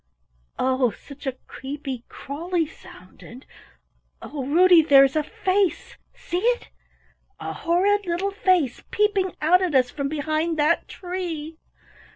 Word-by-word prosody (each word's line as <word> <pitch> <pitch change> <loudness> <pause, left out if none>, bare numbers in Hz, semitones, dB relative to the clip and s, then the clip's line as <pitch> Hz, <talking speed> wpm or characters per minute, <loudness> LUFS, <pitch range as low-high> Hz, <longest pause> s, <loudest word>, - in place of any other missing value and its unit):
"Oh, 260 -1 +2
such 280 +5 -12
a 265 - 0
creepy, 270 -3 -7
crawly 330 +4 -3
sound, 185 -10 -16
and 250 +3 -12 0.7
Oh, 275 -2 -6
Ruddy 350 +3 +6
there 280 -3 +7
is 270 +1 +1
a 310 - +3
face 390 +1 -1 0.2
see 350 - -3
it? 480 +4 0 0.7
A - - -5
horrid 390 +4 +1
little 355 +4 -1
face 370 - +1
peeping 410 -3 +1
out 360 +4 +5
at 355 -6 0
us 250 -1 +3
from 280 -2 -3
behind 310 +2 -1
that 305 +3 +2
tree!" 335 -4 -6
320 Hz, 135 wpm, -24 LUFS, 280-370 Hz, 0.7 s, there